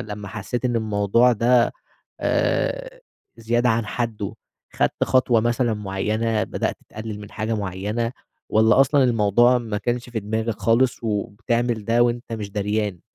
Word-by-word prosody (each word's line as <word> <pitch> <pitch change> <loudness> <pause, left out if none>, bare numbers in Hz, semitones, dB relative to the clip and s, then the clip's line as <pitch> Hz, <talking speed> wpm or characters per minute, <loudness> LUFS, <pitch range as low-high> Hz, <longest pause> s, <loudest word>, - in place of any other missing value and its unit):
لمّا 105 -1 -7
حسيت 110 +5 -4
إن 120 -2 +1
الموضوع 110 +2 +3
ده 120 +1 +3 0.5
آآ - - -1 0.4
زيادة 120 +2 +1
عن 115 -1 +1
حده، 110 -3 -3 0.4
خدت - - 0
خطوة 125 -3 +3
مثلًا 120 0 +1
معيّنة، 105 +2 -1
بدأت - - -2
تقلِّل 110 -1 -7
من 105 - -10
حاجة 110 +1 -2
معيّنة، 105 +4 -2 0.4
والّا 110 +2 +4
أصلًا 135 0 +4
الموضوع 120 +1 +4
ما 110 -4 -3
كانش 120 +2 -2
في 115 -2 -3
دماغك 110 +2 -2
خالص، 115 +4 +2
وبتعمل 115 +2 -1
ده 115 +3 +3
وأنت 120 0 -1
مش 105 -3 -4
دريان؟ 105 -2 -2
115 Hz, 140 wpm, -22 LUFS, 105-120 Hz, 0.5 s, والّا